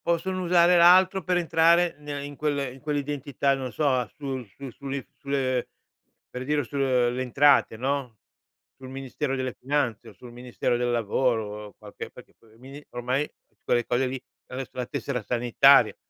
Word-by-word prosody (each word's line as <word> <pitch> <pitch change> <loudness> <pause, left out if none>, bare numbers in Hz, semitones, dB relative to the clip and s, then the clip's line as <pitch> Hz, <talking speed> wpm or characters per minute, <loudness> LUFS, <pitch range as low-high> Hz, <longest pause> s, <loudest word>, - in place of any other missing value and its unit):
Possono 185 +2 -1
usare 175 0 +5
l'altro 185 +2 +6
per 180 -1 +1
entrare 170 0 +3
ne 145 -1 -6
in 145 0 -8
quelle 140 -3 -1
in 135 - -14
quell'identità, 145 -1 -1
non 130 -2 -4
so, 150 +3 0
a 130 -3 +1
su 135 -3 -4
su 130 +6 -10
sulle 140 0 -6
sulle 130 -3 -1 0.6
per 125 - -7
dire, 145 +2 0
sulle 125 -2 0
Entrate, 140 -2 +3
no, 130 -2 -2 0.6
sul 130 -1 -11
Ministero 135 +1 -4
delle 130 -2 -3
Finanze 130 -5 -1
o - - -15
sul 125 - -13
Ministero 120 0 -2
del 120 0 0
Lavoro, 110 -2 -1
qualche 105 -1 -9
perché - - -15
il 110 -1 -23
mini 135 +3 -11
ormai 125 +4 -1 0.3
quelle 120 -1 +1
cose 125 +2 0
lì 130 +1 -4 0.3
adesso 130 0 -6
la 125 -2 -4
tessera 130 -2 -3
sanitaria. 120 0 +4
135 Hz, 160 wpm, -26 LUFS, 125-145 Hz, 0.6 s, l'altro